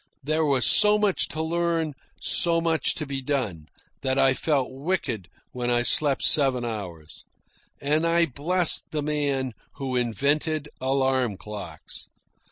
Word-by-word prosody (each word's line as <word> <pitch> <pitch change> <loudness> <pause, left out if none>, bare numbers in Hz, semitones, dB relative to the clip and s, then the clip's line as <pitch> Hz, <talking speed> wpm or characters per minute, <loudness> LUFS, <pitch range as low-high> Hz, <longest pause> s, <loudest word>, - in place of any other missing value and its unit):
There 155 +3 0
was 135 -4 +2
so 210 0 +6
much 210 -3 +2
to 160 - -4
learn, 165 -1 -1 0.3
so 170 -1 +3
much 165 -1 0
to 150 - -4
be 135 -1 -4
done, 120 - -3 0.3
that 130 0 -1
I 135 -1 +4
felt 140 -2 0
wicked 135 - -3 0.2
when 125 -1 -3
I 120 0 +2
slept 140 +2 +2
seven 135 -4 +3
hours. 90 -9 -7 0.6
And 150 +4 0
I 170 0 +3
blessed 165 +5 +3
the 150 -2 -3
man 140 -3 -1 0.2
who 135 -2 -4
invented 145 - 0
alarm 130 -4 0
clocks. 100 -8 -8
140 Hz, 140 wpm, -25 LUFS, 125-160 Hz, 0.6 s, so